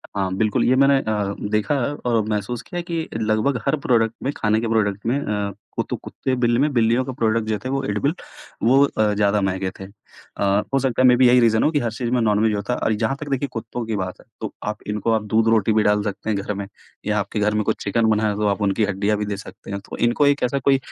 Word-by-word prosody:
हाँ, 95 Hz, -2 st, -1 dB
बिल्कुल 110 Hz, +3 st, +1 dB
ये 130 Hz, -, +3 dB
मैंने 140 Hz, +1 st, +5 dB
अ, 105 Hz, -4 st, -1 dB, 0.2 s
देखा 105 Hz, +6 st, +1 dB, 0.3 s
और 115 Hz, -2 st, +2 dB
महसूस 105 Hz, +3 st, -2 dB
किया 175 Hz, -, -5 dB
कि 170 Hz, -2 st, -4 dB
लगभग 110 Hz, +4 st, +1 dB
हर 135 Hz, -, +3 dB
प्रोडक्ट 115 Hz, -4 st, +2 dB
में 135 Hz, -, 0 dB
खाने 110 Hz, 0 st, +1 dB
के 115 Hz, -, -2 dB
प्रोडक्ट 105 Hz, -2 st, 0 dB
में 125 Hz, +5 st, +1 dB
अ, 105 Hz, -6 st, -2 dB, 0.2 s
कुतो -, -, -2 dB
कुत्ते-बिल्ली 125 Hz, -3 st, -1 dB
में 145 Hz, +2 st, +2 dB
बिल्लियों 120 Hz, +1 st, +3 dB
का 130 Hz, -, -4 dB
प्रोडक्ट 115 Hz, -2 st, 0 dB
जो 110 Hz, -, +1 dB
थे 130 Hz, -, -6 dB
वो 135 Hz, 0 st, -1 dB
एडिबल 135 Hz, +7 st, 0 dB, 0.5 s
वो 135 Hz, +4 st, +5 dB
अ, 110 Hz, -6 st, 0 dB
ज़्यादा 105 Hz, 0 st, +2 dB
महँगे 95 Hz, 0 st, -1 dB
थे। -, -, -7 dB
अ, 100 Hz, 0 st, -3 dB
हो 135 Hz, -, +4 dB
सकता 130 Hz, -2 st, 0 dB
है 130 Hz, -, +6 dB
मे 125 Hz, -, +6 dB
बी 125 Hz, 0 st, +6 dB
यही 125 Hz, +1 st, +6 dB
रीज़न 110 Hz, -2 st, +3 dB
हो 155 Hz, -, +3 dB
कि 150 Hz, -, +1 dB
हर 115 Hz, -4 st, -2 dB
चीज़ 120 Hz, +1 st, -3 dB
में 125 Hz, -, +2 dB
नॉन-वेज 110 Hz, 0 st, +2 dB
होता 100 Hz, +4 st, -2 dB
है। -, -, -3 dB
और -, -, 0 dB
ये 105 Hz, -, 0 dB
जहाँ 115 Hz, +5 st, 0 dB
तक 150 Hz, -, -6 dB
देखिए 140 Hz, +1 st, -1 dB
कुत्तों 115 Hz, +1 st, -5 dB
की 110 Hz, -, -2 dB
बात 95 Hz, -2 st, -4 dB
है -, -, -22 dB, 0.2 s
तो -, -, -4 dB
आप 105 Hz, 0 st, -4 dB
इनको 105 Hz, +2 st, -1 dB
आप 110 Hz, -1 st, +1 dB
दूध-रोटी 110 Hz, -1 st, +3 dB
भी 110 Hz, 0 st, +3 dB
डाल 105 Hz, 0 st, +2 dB
सकते 105 Hz, +1 st, -4 dB
हैं 105 Hz, -, +1 dB
घर 105 Hz, -, -3 dB
में 100 Hz, 0 st, -5 dB, 0.4 s
या 105 Hz, 0 st, +1 dB
आपके 100 Hz, +1 st, -3 dB
घर 105 Hz, 0 st, +1 dB
में 105 Hz, 0 st, +1 dB
कुछ -, -, -2 dB
चिकन 110 Hz, +3 st, +1 dB
बना 110 Hz, 0 st, +2 dB
है 105 Hz, -, -1 dB
तो 105 Hz, 0 st, 0 dB
आप 100 Hz, +1 st, 0 dB
उनकी 100 Hz, +2 st, +1 dB
हड्डियाँ 100 Hz, +1 st, 0 dB
भी 105 Hz, -, -2 dB
दे 100 Hz, -1 st, -3 dB
सकते 100 Hz, -, -11 dB
हैं। 100 Hz, -, -3 dB
तो -, -, -6 dB
इनको 120 Hz, +5 st, +2 dB
एक 145 Hz, -1 st, +2 dB
ऐसा 125 Hz, +3 st, +1 dB
कोई 135 Hz, +1 st, +3 dB
110 Hz, 260 wpm, -22 LUFS, 105-125 Hz, 0.5 s, है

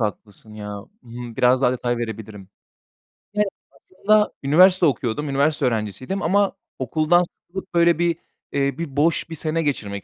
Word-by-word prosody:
haklısın 105 Hz, 0 st, -5 dB
ya. 105 Hz, -1 st, -6 dB
Hı 100 Hz, -, -8 dB, 0.3 s
hı. 120 Hz, -1 st, -8 dB
Biraz 125 Hz, +1 st, +3 dB
daha 125 Hz, -, +4 dB
detay 120 Hz, -1 st, -1 dB
verebilirim. 110 Hz, -4 st, -7 dB, 0.9 s
Yani, 210 Hz, 0 st, +2 dB, 0.3 s
aslında 210 Hz, +3 st, +1 dB
üniversite 180 Hz, +6 st, +5 dB
okuyordum, 140 Hz, 0 st, -1 dB
üniversite 140 Hz, +1 st, +1 dB
öğrencisiydim 115 Hz, -, -2 dB
ama 200 Hz, +3 st, +2 dB, 0.3 s
okuldan 155 Hz, +7 st, +2 dB
sıkılıp, 190 Hz, +2 st, -10 dB
böyle 170 Hz, -1 st, +4 dB
bir, 170 Hz, -1 st, +2 dB, 0.4 s
eee, 140 Hz, -1 st, 0 dB
bir 155 Hz, -5 st, -5 dB
boş 160 Hz, +3 st, +1 dB
bir 165 Hz, -, -6 dB
sene 160 Hz, +1 st, -1 dB
geçirmek 100 Hz, -10 st, -3 dB
140 Hz, 150 wpm, -22 LUFS, 115-170 Hz, 0.9 s, üniversite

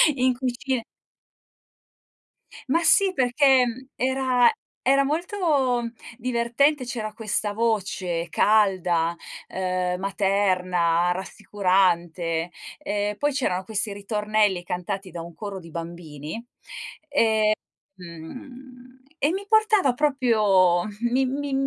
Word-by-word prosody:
in 255 Hz, -1 st, +2 dB
cucina 255 Hz, -1 st, -2 dB, 1.9 s
Ma 335 Hz, +5 st, +2 dB
sì, 385 Hz, +3 st, +4 dB
perché, 260 Hz, -2 st, +4 dB
mhmm, 250 Hz, +2 st, -6 dB
era 260 Hz, -1 st, +3 dB, 0.3 s
era 275 Hz, +2 st, +3 dB
molto 295 Hz, -5 st, 0 dB, 0.3 s
divertente, 255 Hz, +4 st, +1 dB
c'era 230 Hz, -3 st, -4 dB
questa 215 Hz, -1 st, -2 dB
voce 195 Hz, -6 st, -1 dB
calda, 180 Hz, -5 st, +2 dB, 0.3 s
uhm, 185 Hz, -1 st, -2 dB
materna, 185 Hz, -3 st, +1 dB
rassicurante, 180 Hz, -4 st, 0 dB, 0.3 s
ehm, 205 Hz, 0 st, -2 dB
poi 290 Hz, 0 st, +1 dB
c'erano 190 Hz, -9 st, -1 dB
questi 215 Hz, +1 st, -2 dB
ritornelli 210 Hz, -2 st, 0 dB
cantati 185 Hz, +2 st, -4 dB
da 170 Hz, -, -7 dB
un 170 Hz, +1 st, -10 dB
coro 200 Hz, +2 st, -6 dB
di 170 Hz, -2 st, -13 dB
bambini, 165 Hz, +1 st, -7 dB, 0.7 s
ehm, 285 Hz, -3 st, +2 dB, 0.7 s
mhmm, 250 Hz, +9 st, -12 dB, 0.2 s
e 290 Hz, -, +2 dB
mi 390 Hz, +2 st, -4 dB
portava 430 Hz, -, +3 dB
proprio 215 Hz, -11 st, +3 dB, 0.3 s
mi 265 Hz, +2 st, +2 dB
mi 280 Hz, +2 st, -3 dB
215 Hz, 100 wpm, -24 LUFS, 180-260 Hz, 1.9 s, sì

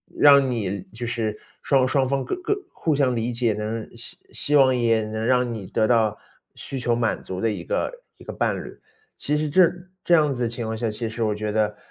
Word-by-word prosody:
让 140 Hz, -2 st, +6 dB
你 100 Hz, -5 st, -2 dB
就 120 Hz, +2 st, -5 dB
是 110 Hz, -3 st, -2 dB, 0.3 s
双 135 Hz, -2 st, +3 dB
双 135 Hz, -1 st, +2 dB
方 135 Hz, 0 st, 0 dB
各 -, -, -2 dB
各 400 Hz, +3 st, 0 dB, 0.2 s
互 155 Hz, -3 st, 0 dB
相 130 Hz, -3 st, +2 dB
理 115 Hz, +1 st, -1 dB
解 115 Hz, -2 st, +1 dB
能， 110 Hz, +2 st, -4 dB
希 115 Hz, -, -8 dB
希 150 Hz, -, -1 dB
望 130 Hz, -2 st, +6 dB
也 115 Hz, -2 st, +2 dB
能 110 Hz, +1 st, -4 dB
让 125 Hz, 0 st, +2 dB
你 105 Hz, -4 st, -6 dB
得 110 Hz, +3 st, +1 dB
到 110 Hz, -3 st, +2 dB, 0.4 s
需 135 Hz, -, -6 dB
求 120 Hz, -1 st, +1 dB
满 115 Hz, -2 st, 0 dB
足 95 Hz, -, -5 dB
的 115 Hz, -, +2 dB
一 95 Hz, -5 st, -5 dB
个 -, -, -1 dB, 0.3 s
一 -, -, -15 dB
个 -, -, -5 dB
伴 -, -, 0 dB
侣。 -, -, -11 dB, 0.4 s
其 150 Hz, -, -1 dB
实 150 Hz, 0 st, -1 dB
这 175 Hz, +2 st, +6 dB, 0.3 s
这 175 Hz, -, +2 dB
样 150 Hz, -4 st, +4 dB
子 120 Hz, -2 st, -1 dB
情 120 Hz, 0 st, -4 dB
况 110 Hz, 0 st, -3 dB
下， 115 Hz, 0 st, -1 dB
其 110 Hz, +2 st, -4 dB
实 115 Hz, +1 st, -3 dB
我 105 Hz, -1 st, +1 dB
觉 105 Hz, 0 st, -3 dB
得 105 Hz, -1 st, +1 dB
120 Hz, 240 characters per minute, -24 LUFS, 110-135 Hz, 0.4 s, 让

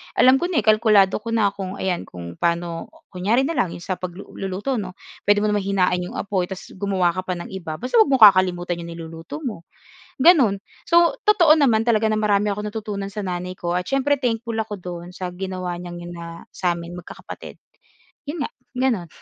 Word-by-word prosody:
alam 260 Hz, +1 st, +6 dB
ko 350 Hz, -, 0 dB
na, 330 Hz, -, 0 dB
kalkulado 215 Hz, -3 st, +4 dB
ko 230 Hz, +1 st, -3 dB
na 205 Hz, -3 st, +3 dB
kung, 190 Hz, -1 st, -6 dB
ayan 185 Hz, -2 st, -2 dB
kung 85 Hz, -1 st, -9 dB
paano 170 Hz, 0 st, -1 dB, 0.2 s
kunyari 205 Hz, +8 st, +1 dB
na 325 Hz, +3 st, -1 dB
lang 175 Hz, -, 0 dB
yung 175 Hz, -, -10 dB
sa 185 Hz, -, -3 dB
pagluluto 195 Hz, +6 st, -4 dB
'no, 185 Hz, -2 st, -6 dB, 0.3 s
puwede 205 Hz, 0 st, +4 dB
mo 215 Hz, -, +2 dB
naman 210 Hz, -, +2 dB
hinain 185 Hz, -2 st, +2 dB
yung 180 Hz, -, -6 dB
apoy 190 Hz, -3 st, -1 dB
tapos 190 Hz, -1 st, -8 dB
gumawa 190 Hz, -3 st, +1 dB
ka 185 Hz, +1 st, -5 dB
pa 180 Hz, -, -1 dB
ng 175 Hz, -, -8 dB
iba, 175 Hz, -5 st, -5 dB
basta 250 Hz, -, +1 dB
huwag 440 Hz, -, +6 dB
mong 265 Hz, -5 st, +5 dB
kakalimutan 175 Hz, -2 st, 0 dB
yung 170 Hz, -, -7 dB
niluluto 165 Hz, -, -8 dB
mo, 215 Hz, -10 st, -5 dB, 0.5 s
ganun. 260 Hz, -, +5 dB, 0.2 s
So 340 Hz, 0 st, +4 dB
totoo 350 Hz, -7 st, +6 dB
naman 225 Hz, -6 st, +4 dB
talaga 220 Hz, -2 st, +2 dB
na 215 Hz, -, +1 dB
marami 210 Hz, -1 st, +2 dB
akong 210 Hz, 0 st, -4 dB
natutunan 205 Hz, -2 st, -5 dB
sa 210 Hz, -, -6 dB
nanay 180 Hz, -2 st, -3 dB
ko 175 Hz, 0 st, -2 dB
at 180 Hz, -, 0 dB
siyempre 275 Hz, +5 st, +1 dB
thankful 235 Hz, -3 st, -2 dB
ako 215 Hz, -2 st, -3 dB
dun 175 Hz, 0 st, -7 dB
sa 180 Hz, 0 st, -5 dB
ginawa 185 Hz, -1 st, -4 dB
niyang 175 Hz, 0 st, -7 dB
yun 175 Hz, 0 st, -8 dB
na, 170 Hz, 0 st, -9 dB
sa'min 175 Hz, -1 st, -2 dB
magkakapatid, 180 Hz, -, -10 dB, 0.7 s
yun 295 Hz, 0 st, -2 dB
nga, -, -, -5 dB, 0.3 s
ganun. 235 Hz, -10 st, 0 dB
195 Hz, 195 wpm, -22 LUFS, 175-225 Hz, 0.7 s, alam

